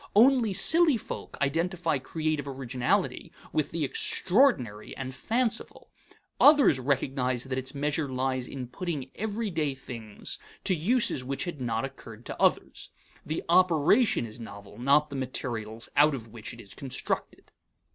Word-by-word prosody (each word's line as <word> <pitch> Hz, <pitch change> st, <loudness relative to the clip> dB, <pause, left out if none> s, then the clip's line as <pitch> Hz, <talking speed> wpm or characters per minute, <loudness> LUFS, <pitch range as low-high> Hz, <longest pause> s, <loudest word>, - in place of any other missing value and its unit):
Only 240 Hz, 0 st, +5 dB
silly 320 Hz, -, +5 dB
folk -, -, -7 dB
identify 165 Hz, +1 st, 0 dB
creative 155 Hz, +1 st, -2 dB
originality 130 Hz, -2 st, -1 dB, 0.2 s
with 155 Hz, -, 0 dB
the 165 Hz, -3 st, -1 dB
extraordinary 140 Hz, -, +1 dB
and 130 Hz, -1 st, -5 dB
fanciful; 230 Hz, -, -2 dB, 0.5 s
others 290 Hz, -, +6 dB
recognize 130 Hz, -2 st, 0 dB
that 130 Hz, -1 st, -3 dB
its 130 Hz, +2 st, -6 dB
measure 145 Hz, +1 st, -1 dB
lies 130 Hz, -1 st, -1 dB
in 130 Hz, -2 st, -6 dB
putting 140 Hz, 0 st, -5 dB
everyday 200 Hz, -9 st, -2 dB
things 115 Hz, -5 st, -6 dB, 0.2 s
to -, -, +2 dB
uses 185 Hz, -, +1 dB
which 135 Hz, +2 st, -3 dB
had 170 Hz, -6 st, -6 dB
not 115 Hz, 0 st, -1 dB
occurred 120 Hz, -4 st, -11 dB
to -, -, -7 dB
others. -, -, +1 dB, 0.3 s
The 155 Hz, -, -3 dB
operation 175 Hz, -, +4 dB
is 110 Hz, +1 st, -10 dB
novel, 100 Hz, -1 st, -10 dB
not 145 Hz, +4 st, +3 dB
the -, -, -5 dB
materials 115 Hz, -4 st, -4 dB
out 150 Hz, 0 st, +5 dB
of 115 Hz, -3 st, -8 dB
which 110 Hz, -1 st, -8 dB
it -, -, -12 dB
is 100 Hz, -, -11 dB
constructed. 135 Hz, -2 st, -4 dB
140 Hz, 140 wpm, -28 LUFS, 125-175 Hz, 0.5 s, others